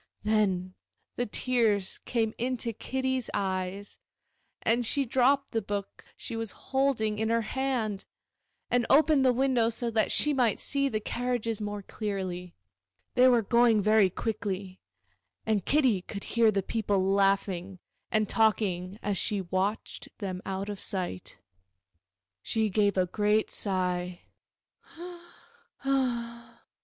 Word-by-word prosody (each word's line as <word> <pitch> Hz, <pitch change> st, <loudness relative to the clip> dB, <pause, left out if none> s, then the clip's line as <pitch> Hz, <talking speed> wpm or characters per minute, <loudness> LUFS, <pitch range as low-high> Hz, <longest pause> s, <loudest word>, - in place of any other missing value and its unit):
Then 195 Hz, -4 st, +1 dB, 0.4 s
the 245 Hz, -, -1 dB
tears 215 Hz, -4 st, +1 dB
came 225 Hz, -2 st, 0 dB
into 240 Hz, -1 st, -2 dB
Kitty's 260 Hz, +2 st, -2 dB
eyes, 190 Hz, +1 st, -3 dB, 0.6 s
and 235 Hz, +2 st, +2 dB
she 275 Hz, +4 st, +2 dB
dropped 265 Hz, +3 st, +2 dB
the 225 Hz, -, 0 dB
book 200 Hz, -1 st, -5 dB
she -, -, -6 dB
was 225 Hz, -1 st, -3 dB
holding 250 Hz, -6 st, 0 dB
in 220 Hz, 0 st, 0 dB
her 230 Hz, 0 st, +2 dB
hand, 230 Hz, -5 st, -2 dB, 0.7 s
and 245 Hz, -1 st, +2 dB
opened 300 Hz, -1 st, +5 dB
the 255 Hz, -, +5 dB
window 250 Hz, -2 st, +2 dB
so 235 Hz, +1 st, -1 dB
that 220 Hz, -1 st, +1 dB
she 300 Hz, -, +3 dB
might 245 Hz, -6 st, +2 dB
see 275 Hz, -1 st, +1 dB
the 215 Hz, -, -1 dB
carriages 230 Hz, -1 st, -2 dB
more 205 Hz, -1 st, -4 dB
clearly. 185 Hz, -4 st, -4 dB, 0.6 s
They 250 Hz, +1 st, +6 dB
were 240 Hz, -3 st, +4 dB
going 235 Hz, +1 st, +4 dB
very 215 Hz, -2 st, +5 dB
quickly, 195 Hz, -2 st, -4 dB, 0.7 s
and 215 Hz, -4 st, 0 dB
Kitty 260 Hz, -10 st, +3 dB
could 200 Hz, +2 st, -7 dB
hear 230 Hz, -1 st, +3 dB
the 200 Hz, -2 st, 0 dB
people 195 Hz, -3 st, 0 dB
laughing 195 Hz, -2 st, +1 dB, 0.3 s
and 215 Hz, -1 st, +1 dB
talking 200 Hz, -4 st, +1 dB
as 205 Hz, -3 st, 0 dB
she 205 Hz, -3 st, 0 dB
watched 190 Hz, +4 st, -2 dB
them 185 Hz, -3 st, -4 dB
out 195 Hz, +1 st, -3 dB
of 205 Hz, -2 st, -6 dB
sight. 180 Hz, -, -4 dB, 1.0 s
She 220 Hz, -, 0 dB
gave 205 Hz, 0 st, +2 dB
a 185 Hz, -, +3 dB
great 210 Hz, +3 st, +1 dB
sigh. 180 Hz, -2 st, -1 dB
215 Hz, 125 wpm, -28 LUFS, 195-240 Hz, 1.0 s, They